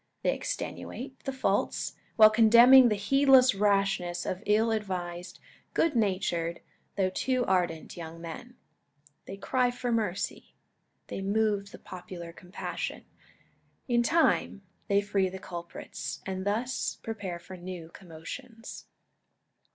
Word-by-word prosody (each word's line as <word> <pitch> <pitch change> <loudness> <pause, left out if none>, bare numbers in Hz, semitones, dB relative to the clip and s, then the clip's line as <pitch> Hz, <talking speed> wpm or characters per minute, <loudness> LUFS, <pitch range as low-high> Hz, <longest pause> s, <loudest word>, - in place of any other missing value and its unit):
They - - +2
extenuate 265 - -6
the 270 - -1
faults, 265 0 -1 0.2
while 215 -1 +8
condemning 235 +3 +8
the 210 - +1
heedless 265 +4 +5
rashness 195 -3 +1
of 185 - -3
ill 220 +2 +3
advised, 180 -4 -4 0.4
good 325 -4 +2
natured, 185 -6 0 0.3
though 190 -2 +1
too 255 +5 0
ardent, 175 -4 -1
young 165 -1 -8
men. 170 +9 -9 0.7
They 195 - -7
cry 250 +4 +1
for 245 0 -3
mercy. 215 -5 -2 0.5
They - - -6
move 205 0 0
the - - -11
popular 175 -2 -9
compassion. 180 +2 -6 0.8
In 240 -2 +3
time, 295 -7 +2 0.2
they 200 0 +3
free 200 -2 0
the 190 - -7
culprits, 175 -2 -7
and 190 0 -4
thus 235 +5 -1
prepare 205 -6 -5
for 185 +2 -11
new 175 -2 -8
commotions. 210 +8 -10
200 Hz, 120 wpm, -29 LUFS, 180-235 Hz, 0.8 s, while